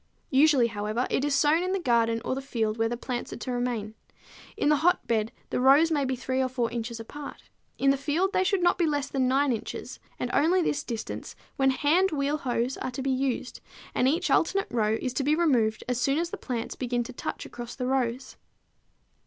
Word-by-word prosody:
Usually, 275 -2 +5
however, 215 +2 -2
it 265 - +1
is 290 -1 +1
sown 300 +3 +4
in 370 +1 -1
the 390 - 0
garden 230 -6 +1
or - - 0
the 270 - -3
field 225 -5 -2
where 225 0 +2
the 240 - -3
plants 245 0 -4
are - - -6
to 250 +2 -5
remain. 245 -4 -2 0.6
In 290 - +2
the 300 - +4
hotbed 235 -10 +1 0.2
the - - 0
rows 280 +6 +5
may 290 -3 +1
be 260 0 -1
3 260 +1 -1
or 260 - 0
4 245 -2 -1
inches 235 0 -4
apart; 285 +6 -9 0.3
in 275 0 +4
the 275 - +1
field 320 +8 0
they 370 - +3
should 385 -1 +1
be - - -1
not 350 +1 +3
less 290 -4 0
than 265 -2 +1
9 270 +1 +2
inches, 225 - -6 0.2
and - - -3
only 350 +4 +3
this 290 -2 -1
distance 230 -3 -6 0.2
when 270 0 +3
hand 310 +8 +3
wheel 290 -2 0
hoes 245 -1 -1
are - - -3
to 255 +1 -5
be 270 - 0
used, 260 -1 -2 0.3
and 250 - +2
each 335 +6 +1
alternate 390 +4 +2
row 220 -2 +1
is 255 - -3
to 275 - -1
be 295 +3 +3
removed 245 -10 +2
as 250 0 -1
soon 275 +3 +2
as 340 +1 -1
the - - -3
plants 235 -3 -4
begin 245 -1 -1
to 255 - -9
touch - - -5
across 240 0 -8
the 250 - -3
rows. 255 -1 -1
265 Hz, 220 wpm, -27 LUFS, 240-295 Hz, 0.6 s, Usually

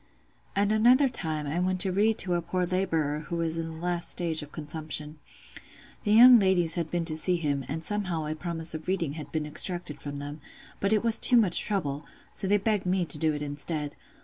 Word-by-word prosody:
At 200 +1 +2
another 245 +6 +4
time 160 - -4
I 150 +4 -2
went 185 +1 -1
to 190 - +2
read 210 +4 +1
to 180 - 0
a 175 - 0
poor 180 +2 -2
labourer 165 -5 -1
who 170 - -4
was 165 -1 -2
in 165 - -4
the 160 - -9
last 175 +1 -2
stage 165 -3 -1
of 150 0 -11
consumption. 155 0 -6 0.9
The 205 - +1
young 240 +2 +8
ladies 180 -4 +3
had 170 -2 -2
been 175 -1 -2
to 155 -2 -2
see 180 +3 +2
him, 145 -5 -2
and 160 +3 -5
somehow 185 -5 -2
a 155 - -3
promise 165 0 -3
of 155 0 -7
reading 175 -6 -1
had 155 -1 -9
been 155 -1 -2
extracted 175 0 -1
from 145 0 -6
them; 145 +1 -7 0.4
but 200 - 0
it 215 0 +2
was 230 -1 +5
too 245 - +7
much 200 -7 +4
trouble, 150 -8 -2 0.3
so 195 - -2
they 205 +2 +3
begged 205 -2 -1
me 180 -1 +1
to 155 - -3
do 160 0 +1
it 150 - -5
instead. 145 +1 -4
170 Hz, 220 wpm, -27 LUFS, 155-190 Hz, 0.9 s, young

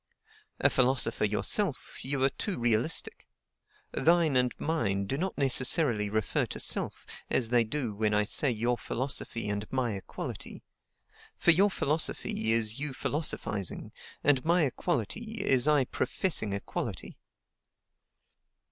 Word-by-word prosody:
A - - +4
philosopher 125 -4 +2
yourself, 130 - 0
you 135 0 -2
are 135 - +3
too 200 +7 -4
realistic. 120 +5 0 0.6
THINE 165 -3 +2
and 125 -1 +2
MINE 100 -12 -1
do 135 - -3
not 185 +7 -3
necessarily 130 -4 +4
refer 110 0 -1
to - - -7
self, - - -1 0.2
as 120 -4 0
they 120 -1 +3
do 115 0 -4
when 105 +1 0
I 105 0 +2
say 140 +6 +2
your 120 +1 -1
philosophy, 120 -3 -3
and 105 +1 -4
my 125 -4 -1
equality; 95 - -7 0.7
for 170 - +5
your 195 +5 +4
philosophy 150 - 0
is 115 0 +2
you 145 -1 -3
philosophizing, 115 - -2 0.3
and 140 -3 +3
my 170 +1 +3
equality 215 - -3
is 130 +1 +3
I 150 -3 +3
professing 120 - -1
equality. 100 - -5
130 Hz, 130 wpm, -29 LUFS, 110-150 Hz, 0.7 s, for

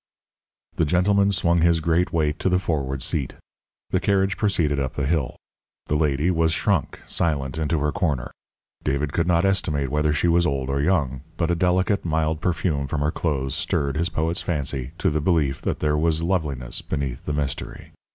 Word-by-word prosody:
The - - +3
gentleman 100 +5 +3
swung 85 -2 +2
his 85 0 +4
great 85 +2 +1
weight 75 -2 0
to - - +1
the 90 - +3
forward 70 -7 -2
seat. 70 -5 -1 0.6
The - - +2
carriage 95 -1 +1
proceeded 85 -10 +1
up 65 -2 -2
the 70 - -1
hill. 75 -3 0 0.5
The 75 - -1
lady 75 +2 +2
was 80 -1 +2
shrunk, 95 -4 0
silent, 75 -2 -1
into 80 +1 0
her 75 0 +1
corner. 80 -9 -1 0.5
David 70 +1 -1
could 85 0 +1
not 85 +1 +3
estimate 75 -8 0
whether 75 0 +2
she 75 +4 +1
was 85 +1 +3
old 70 -2 -1
or 70 +1 0
young, 70 -6 +1 0.2
but 85 0 +1
a - - +2
delicate, 90 +3 +1
mild 80 -1 0
perfume 80 -5 0
from 70 +2 -2
her 75 +1 +1
clothes 70 -6 -2
stirred 70 -1 -1
his 85 +3 0
poet's 80 +3 -1
fancy 70 -6 -2
to - - +1
the 75 0 0
belief 75 -5 +1
that - - -2
there 75 -1 +2
was 80 +1 +1
loveliness 75 -9 -1
beneath 70 -5 -4
the 75 - -2
mystery. 70 -2 -4
80 Hz, 185 wpm, -23 LUFS, 70-85 Hz, 0.6 s, his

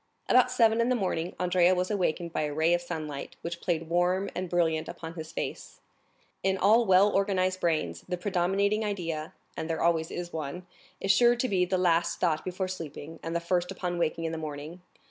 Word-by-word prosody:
About 250 0 +5
seven 230 -2 +3
in 235 - +1
the 255 - +3
morning 180 -5 -2
Andrea 180 0 +3
was 180 +3 -1
awakened 175 -4 -1
by - - 0
a 150 -1 -2
ray 160 +2 +3
of 175 - +2
sunlight, 155 -5 -6
which 170 0 -5
played, 165 -2 -1
warm 180 +3 +1
and 185 -1 -4
brilliant, 160 -2 +1
upon 165 0 -7
his 160 -1 -7
face. - - -5 0.6
In 190 0 +1
all 220 +4 +4
well 190 +2 +6
organized 185 -2 +1
brains, 155 - -1
the 180 - -1
predominating 200 +3 +1
idea—and 165 -5 -5
there 160 -1 -1
always 165 -1 +2
is 175 0 -6
one—is 175 +5 -4
sure 240 +4 +5
to 245 +2 0
be 185 -5 +2
the 185 +1 0
last 175 -2 +2
thought 160 -4 +1
before 185 +1 -3
sleeping, 165 -3 -7
and 165 +1 -4
the - - +2
first 175 +1 0
upon 180 -2 -3
waking 165 0 0
in 165 - -1
the 160 - -4
morning. 155 +3 -7
175 Hz, 195 wpm, -28 LUFS, 165-190 Hz, 0.6 s, well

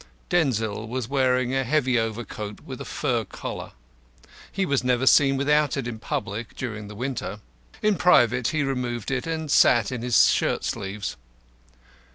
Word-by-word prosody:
Denzil 115 -10 0
was 125 0 -3
wearing 130 -2 +1
a 135 0 +1
heavy 130 -2 +2
overcoat 110 -2 -5
with - - -8
a - - -6
fur - - -1
collar. - - -7 0.8
He 195 0 -1
was 140 -6 0
never 125 0 +1
seen 135 0 +5
without 150 +1 +2
it 130 -3 -2
in 115 -2 -5
public 115 -4 -4
during 110 -5 -5
the 105 - -10
winter. 130 +3 -4 0.4
In 210 -2 +3
private 125 -8 +4
he 155 -2 0
removed 125 -4 -3
it 130 +2 -2
and 160 -2 -3
sat 120 -3 +5
in 125 -3 -4
his 120 -1 +5
shirt - - 0
sleeves. 100 +1 -4
125 Hz, 160 wpm, -25 LUFS, 115-140 Hz, 0.8 s, seen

